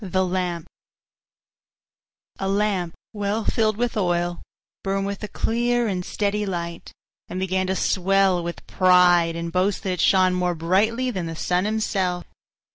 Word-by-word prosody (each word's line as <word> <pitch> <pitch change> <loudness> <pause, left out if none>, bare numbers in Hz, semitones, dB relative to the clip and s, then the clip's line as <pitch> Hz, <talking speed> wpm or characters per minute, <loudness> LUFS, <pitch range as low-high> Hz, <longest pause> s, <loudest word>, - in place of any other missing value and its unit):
THE 185 0 0
LAMP 180 -2 -2 1.7
A 195 - -1
Lamp, 195 -4 0 0.2
well 205 +1 -2
filled 215 -2 +1
with 245 +1 -1
oil, 175 -3 0 0.4
burned 195 0 -1
with 200 0 -4
a 210 - -4
clear 240 +2 0
and 185 -3 -2
steady 210 +2 -1
light, 170 -3 -5 0.4
and 185 - -5
began 185 0 0
to 190 - 0
swell 190 -1 +2
with 170 0 -6
pride 180 -2 +4
and 170 0 -4
boast 185 +3 0
that 190 - -1
it 180 - -1
shone 185 -1 +4
more 180 -1 0
brightly 215 +10 +1
than 185 -6 -3
the 165 - -5
sun 180 +3 0
himself. 195 -4 -1
185 Hz, 150 wpm, -23 LUFS, 180-205 Hz, 1.7 s, pride